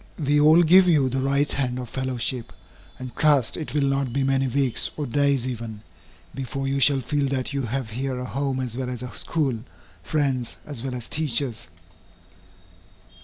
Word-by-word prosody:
We 145 Hz, -1 st, +2 dB
all 160 Hz, +3 st, +7 dB
give 180 Hz, +3 st, +7 dB
you 145 Hz, -6 st, +4 dB
the 130 Hz, +1 st, -1 dB
right 140 Hz, +2 st, +1 dB
hand 125 Hz, -3 st, -1 dB
of 125 Hz, -1 st, -5 dB
fellowship, 130 Hz, -1 st, -3 dB, 0.5 s
and 130 Hz, -1 st, -8 dB
trust 145 Hz, -6 st, +3 dB
it 155 Hz, -2 st, -5 dB
will 145 Hz, -, +2 dB
not 135 Hz, -2 st, 0 dB
be 135 Hz, +3 st, 0 dB
many 135 Hz, 0 st, +1 dB
weeks, 130 Hz, -1 st, +2 dB
or 150 Hz, -, -2 dB
days 140 Hz, -1 st, +1 dB
even, 115 Hz, -4 st, -5 dB, 0.5 s
before 135 Hz, +1 st, -4 dB
you 135 Hz, +1 st, 0 dB
shall 135 Hz, 0 st, +5 dB
feel 145 Hz, +2 st, 0 dB
that 135 Hz, +1 st, -2 dB
you 140 Hz, -, -1 dB
have 125 Hz, -1 st, -3 dB
here 130 Hz, +3 st, -3 dB
a 125 Hz, -, -4 dB
home 135 Hz, 0 st, -2 dB
as 125 Hz, -3 st, -3 dB
well 130 Hz, 0 st, -3 dB
as 125 Hz, -1 st, -5 dB
a 125 Hz, -, -8 dB
school, 140 Hz, -8 st, -1 dB, 0.4 s
friends 135 Hz, -6 st, -1 dB
as 145 Hz, -6 st, -6 dB
well 130 Hz, 0 st, -4 dB
as 120 Hz, -2 st, -5 dB
teachers. 135 Hz, -, -1 dB
135 Hz, 180 wpm, -24 LUFS, 125-140 Hz, 0.5 s, all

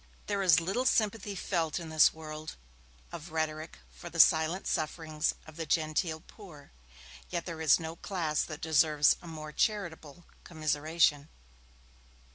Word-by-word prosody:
There 200 Hz, -1 st, -1 dB
is 180 Hz, -5 st, +5 dB
little 195 Hz, +10 st, -1 dB
sympathy 210 Hz, -2 st, 0 dB
felt 170 Hz, -4 st, -1 dB
in 165 Hz, -2 st, -8 dB
this 155 Hz, -1 st, +5 dB
world 155 Hz, -1 st, -8 dB, 0.6 s
of 155 Hz, +2 st, -9 dB
rhetoric 155 Hz, 0 st, -3 dB
for -, -, -10 dB
the -, -, -7 dB
silent 160 Hz, +4 st, +4 dB
sufferings 155 Hz, -1 st, -1 dB
of 155 Hz, 0 st, -13 dB
the 165 Hz, -1 st, -4 dB
genteel 160 Hz, 0 st, 0 dB
poor, 170 Hz, -8 st, -14 dB, 0.6 s
yet 170 Hz, -, -3 dB
there 165 Hz, -2 st, -6 dB
is 160 Hz, -, +5 dB
no 160 Hz, 0 st, -6 dB
class 165 Hz, -7 st, -1 dB
that 155 Hz, -1 st, -8 dB
deserves 155 Hz, -1 st, +4 dB
a 175 Hz, -, -12 dB
more 155 Hz, -2 st, -7 dB
charitable 175 Hz, -5 st, -2 dB, 0.2 s
commiseration. 155 Hz, -1 st, 0 dB
160 Hz, 140 wpm, -30 LUFS, 155-175 Hz, 0.6 s, is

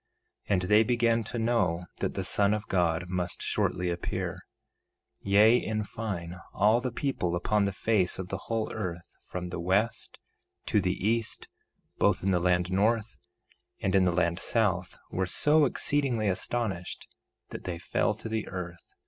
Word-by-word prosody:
1:17 -, -, +1 dB
And 90 Hz, -, +2 dB
they 105 Hz, +4 st, +5 dB
began 115 Hz, -1 st, +2 dB
to 120 Hz, -, -4 dB
know 115 Hz, -7 st, +1 dB
that -, -, -2 dB
the -, -, -2 dB
Son 100 Hz, +1 st, +3 dB
of 105 Hz, -1 st, -6 dB
God 90 Hz, -1 st, +1 dB
must 90 Hz, -1 st, -3 dB
shortly 90 Hz, 0 st, 0 dB
appear; 85 Hz, 0 st, -3 dB, 0.8 s
yea, 105 Hz, +4 st, +5 dB
in 110 Hz, -3 st, -2 dB
fine, 95 Hz, -6 st, -5 dB, 0.2 s
all 110 Hz, +4 st, +4 dB
the 125 Hz, 0 st, -2 dB
people 115 Hz, -10 st, -1 dB
upon 105 Hz, +4 st, +1 dB
the 100 Hz, -, 0 dB
face 100 Hz, -2 st, +1 dB
of 95 Hz, -1 st, -5 dB
the 95 Hz, -1 st, -5 dB
whole 115 Hz, -1 st, -1 dB
earth 90 Hz, -6 st, -5 dB
from 90 Hz, -1 st, -5 dB
the 85 Hz, -, -5 dB
west 100 Hz, +6 st, 0 dB, 0.5 s
to -, -, +2 dB
the 100 Hz, -, -1 dB
east, 115 Hz, 0 st, -1 dB, 0.5 s
both -, -, +3 dB
in 95 Hz, -, +2 dB
the 90 Hz, -, +3 dB
land 90 Hz, 0 st, +1 dB
north 110 Hz, +3 st, +1 dB, 0.6 s
and 95 Hz, -, -1 dB
in 95 Hz, -1 st, +5 dB
the 90 Hz, -, +3 dB
land 85 Hz, 0 st, +1 dB
south, 95 Hz, -5 st, 0 dB
were 95 Hz, 0 st, -1 dB
so 150 Hz, -, +4 dB
exceedingly 130 Hz, -5 st, 0 dB
astonished 95 Hz, -1 st, -2 dB, 0.4 s
that -, -, -8 dB
they 90 Hz, -2 st, -3 dB
fell 105 Hz, +4 st, 0 dB
to 110 Hz, -, -8 dB
the 110 Hz, -1 st, -2 dB
earth. 90 Hz, -2 st, -7 dB
100 Hz, 165 wpm, -29 LUFS, 90-115 Hz, 0.8 s, they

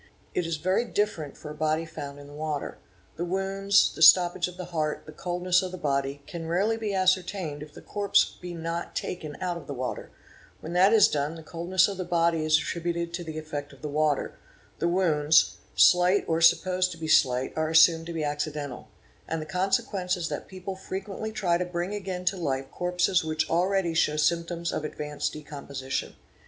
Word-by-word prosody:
It 180 Hz, -, -1 dB
is 165 Hz, -1 st, -2 dB
very 185 Hz, +8 st, +1 dB
different 205 Hz, -, -2 dB
for 150 Hz, -, -8 dB
a -, -, -6 dB
body 155 Hz, +1 st, 0 dB
found 140 Hz, -3 st, -8 dB
in 145 Hz, -, -11 dB
the 145 Hz, -, -13 dB
water; 150 Hz, -1 st, -4 dB, 0.4 s
the 170 Hz, -, -2 dB
wounds, 195 Hz, +2 st, +2 dB
the -, -, -9 dB
stoppage 175 Hz, +1 st, +7 dB
of 180 Hz, 0 st, -10 dB
the 180 Hz, -, -5 dB
heart, 155 Hz, -2 st, -1 dB
the 155 Hz, -, -10 dB
coldness 180 Hz, +1 st, 0 dB
of 185 Hz, -1 st, -4 dB
the 185 Hz, -, -6 dB
body, 140 Hz, -2 st, -1 dB
can 165 Hz, -2 st, -7 dB
rarely 195 Hz, +7 st, +1 dB
be 220 Hz, -2 st, -3 dB
ascertained 185 Hz, -4 st, 0 dB
if 150 Hz, 0 st, -10 dB
the -, -, -11 dB
corpse 205 Hz, -1 st, +2 dB
be 180 Hz, -1 st, -6 dB
not 165 Hz, +1 st, -4 dB
taken 155 Hz, -5 st, -4 dB
out 180 Hz, -2 st, -2 dB
of 170 Hz, -, -11 dB
the 140 Hz, -, -5 dB
water; 125 Hz, -1 st, -4 dB, 0.5 s
when 165 Hz, -, -7 dB
that 185 Hz, +3 st, +5 dB
is 220 Hz, -3 st, +7 dB
done 145 Hz, +2 st, -2 dB
the 165 Hz, -, -10 dB
coldness 175 Hz, +4 st, +1 dB
of 200 Hz, -2 st, -5 dB
the 185 Hz, -, -2 dB
body 170 Hz, -2 st, +1 dB
is 155 Hz, 0 st, +4 dB
attributed 170 Hz, +1 st, -3 dB
to 175 Hz, 0 st, -4 dB
the 160 Hz, -2 st, -7 dB
effect 150 Hz, -2 st, -6 dB
of -, -, -18 dB
the -, -, -2 dB
water; 150 Hz, -1 st, 0 dB, 0.4 s
the 170 Hz, -, +1 dB
wounds, 160 Hz, -4 st, +3 dB, 0.2 s
slight 180 Hz, +2 st, +5 dB
or 165 Hz, 0 st, 0 dB
supposed 185 Hz, +2 st, +4 dB
to 165 Hz, -, -8 dB
be 160 Hz, -1 st, -5 dB
slight, 130 Hz, -4 st, +3 dB
are 155 Hz, 0 st, 0 dB
assumed 165 Hz, 0 st, +5 dB
to -, -, -5 dB
be 160 Hz, -2 st, -2 dB
accidental,—and 145 Hz, +1 st, -5 dB
the 155 Hz, -, -5 dB
consequence 190 Hz, 0 st, 0 dB
is 170 Hz, -1 st, -3 dB
that -, -, -5 dB
people 190 Hz, 0 st, -7 dB
frequently 195 Hz, +3 st, -5 dB
try 175 Hz, -5 st, +1 dB
to -, -, +1 dB
bring 180 Hz, +2 st, -3 dB
again 190 Hz, -3 st, -4 dB
to 195 Hz, -, +2 dB
life 135 Hz, -5 st, -2 dB
corpses 180 Hz, +1 st, +1 dB
which 155 Hz, 0 st, -1 dB
already 180 Hz, 0 st, +1 dB
show 155 Hz, -2 st, +2 dB
symptoms 170 Hz, +2 st, 0 dB
of -, -, -3 dB
ad. 150 Hz, -, -5 dB
vanced 150 Hz, -1 st, -3 dB
decomposition. 140 Hz, -3 st, -5 dB
170 Hz, 200 wpm, -27 LUFS, 155-185 Hz, 0.5 s, stoppage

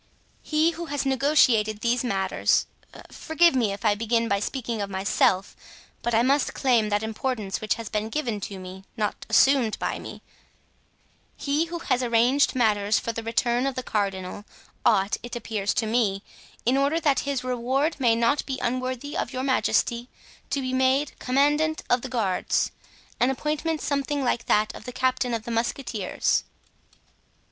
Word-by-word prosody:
"He 310 Hz, +2 st, +2 dB
who 340 Hz, +1 st, -6 dB
has 285 Hz, -1 st, -2 dB
negotiated 255 Hz, -6 st, +3 dB
these 240 Hz, +1 st, +1 dB
matters 195 Hz, -5 st, +1 dB, 0.5 s
(forgive 335 Hz, +1 st, +3 dB
me 235 Hz, -6 st, +1 dB
if 200 Hz, +3 st, -6 dB
I 210 Hz, -, +5 dB
begin 230 Hz, +2 st, 0 dB
by 200 Hz, -2 st, +1 dB
speaking 230 Hz, 0 st, -3 dB
of 200 Hz, -, -3 dB
myself, 190 Hz, 0 st, +1 dB, 0.5 s
but 240 Hz, -1 st, 0 dB
I 230 Hz, -, +4 dB
must 275 Hz, +2 st, +1 dB
claim 235 Hz, -5 st, +2 dB
that 205 Hz, +1 st, 0 dB
importance 220 Hz, -2 st, -3 dB
which 215 Hz, -, 0 dB
has 230 Hz, -2 st, -7 dB
been 215 Hz, +1 st, -2 dB
given 235 Hz, -5 st, -2 dB
to 195 Hz, 0 st, -6 dB
me, 185 Hz, +1 st, -9 dB
not 210 Hz, -2 st, -3 dB
assumed 265 Hz, -5 st, +4 dB
by -, -, -2 dB
me) -, -, -9 dB, 1.1 s
he 295 Hz, +3 st, 0 dB
who 340 Hz, +1 st, -5 dB
has 255 Hz, -6 st, 0 dB
arranged 245 Hz, +4 st, +3 dB
matters 210 Hz, -4 st, +2 dB
for 230 Hz, -, -2 dB
the 230 Hz, -, -5 dB
return 240 Hz, +3 st, 0 dB
of 270 Hz, -, -2 dB
the 255 Hz, -, -3 dB
cardinal, 195 Hz, -3 st, -2 dB, 0.4 s
ought, 200 Hz, -2 st, +3 dB
it 240 Hz, 0 st, -7 dB
appears 215 Hz, -3 st, -2 dB
to 225 Hz, -, +1 dB
me, 215 Hz, -3 st, 0 dB, 0.4 s
in 250 Hz, +3 st, +3 dB
order 280 Hz, +4 st, +2 dB
that 290 Hz, -5 st, +2 dB
his 280 Hz, -3 st, -2 dB
reward 255 Hz, +5 st, 0 dB
may 235 Hz, -3 st, +4 dB
not 235 Hz, +5 st, +2 dB
be 265 Hz, -2 st, -2 dB
unworthy 255 Hz, +3 st, -3 dB
of -, -, -2 dB
your 255 Hz, -1 st, -3 dB
majesty, 250 Hz, -2 st, +1 dB, 0.4 s
to 275 Hz, +1 st, -1 dB
be 255 Hz, 0 st, -3 dB
made 260 Hz, +2 st, +2 dB
commandant 295 Hz, +4 st, +1 dB
of 245 Hz, 0 st, +3 dB
the 260 Hz, -, -6 dB
guards—an 230 Hz, +2 st, -2 dB
appointment 300 Hz, +3 st, -2 dB
something 285 Hz, 0 st, -1 dB
like 240 Hz, -2 st, -1 dB
that 215 Hz, +1 st, +2 dB
of 250 Hz, -, -8 dB
captain 255 Hz, -1 st, 0 dB
of 225 Hz, -, -4 dB
the 235 Hz, -, -6 dB
musketeers." 230 Hz, -3 st, -1 dB
245 Hz, 165 wpm, -25 LUFS, 215-275 Hz, 1.1 s, I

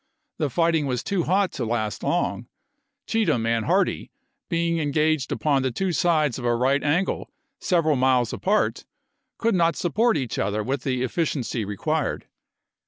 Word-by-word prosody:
The 150 Hz, -3 st, 0 dB
fighting 165 Hz, +1 st, +1 dB
was 125 Hz, -2 st, -2 dB
too 190 Hz, -4 st, -1 dB
hot 190 Hz, +2 st, +2 dB
to 125 Hz, -, -4 dB
last 110 Hz, -2 st, -2 dB
long; -, -, -1 dB, 0.6 s
Cheatham 165 Hz, -, +1 dB
and 115 Hz, -1 st, 0 dB
Hardee, 185 Hz, +3 st, +1 dB, 0.4 s
being 170 Hz, -1 st, 0 dB
engaged 150 Hz, -1 st, +1 dB
upon 140 Hz, -3 st, +1 dB
the 130 Hz, -, 0 dB
two 185 Hz, +9 st, -1 dB
sides 155 Hz, -7 st, +1 dB
of 120 Hz, -, -6 dB
a 120 Hz, 0 st, +2 dB
right 135 Hz, +4 st, +1 dB
angle 165 Hz, +6 st, 0 dB, 0.3 s
several 165 Hz, -5 st, +2 dB
miles 125 Hz, -3 st, +2 dB
apart, 210 Hz, +3 st, 0 dB, 0.5 s
could 230 Hz, 0 st, +1 dB
not 170 Hz, -3 st, +2 dB
support 220 Hz, +6 st, +1 dB
each 125 Hz, -4 st, -3 dB
other 105 Hz, +2 st, -1 dB
with 130 Hz, +3 st, -2 dB
the 130 Hz, -1 st, -1 dB
efficiency 130 Hz, -5 st, -2 dB
re 100 Hz, 0 st, -6 dB
quired. -, -, -1 dB
145 Hz, 160 wpm, -24 LUFS, 125-170 Hz, 0.6 s, hot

